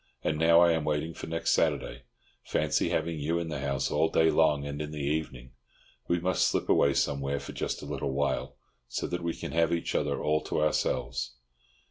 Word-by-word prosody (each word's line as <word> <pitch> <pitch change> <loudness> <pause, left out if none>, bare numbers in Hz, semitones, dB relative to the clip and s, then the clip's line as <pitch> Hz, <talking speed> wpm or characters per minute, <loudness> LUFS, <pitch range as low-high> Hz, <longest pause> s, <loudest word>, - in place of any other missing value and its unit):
And 75 - 0
now 85 +1 +6
I 85 -1 +6
am 80 -2 0
waiting 75 +2 -1
for - - -8
next 80 0 -1
Saturday. - - 0 0.4
Fancy 75 0 0
having 80 0 -1
you 80 +4 0
in 85 -1 -3
the 75 -3 -3
house 70 -1 -1
all 80 +2 +2
day 80 0 +3
long 75 -3 +3
and 70 +1 -4
in 75 - -4
the 75 - -7
evening! 70 -4 -3 0.6
We 85 - +1
must 90 +2 +2
slip - - -1
away 70 -1 +4
somewhere 70 0 0
for - - -8
just - - -3
a - - -6
little 70 -1 -3
while, 70 +1 -1 0.3
so - - -3
that 90 - -3
we 85 -1 -2
can - - -6
have 85 0 +2
each 85 - -1
other - - 0
all 75 0 +1
to - - -1
ourselves. 65 -5 -1
75 Hz, 205 wpm, -29 LUFS, 70-80 Hz, 0.6 s, now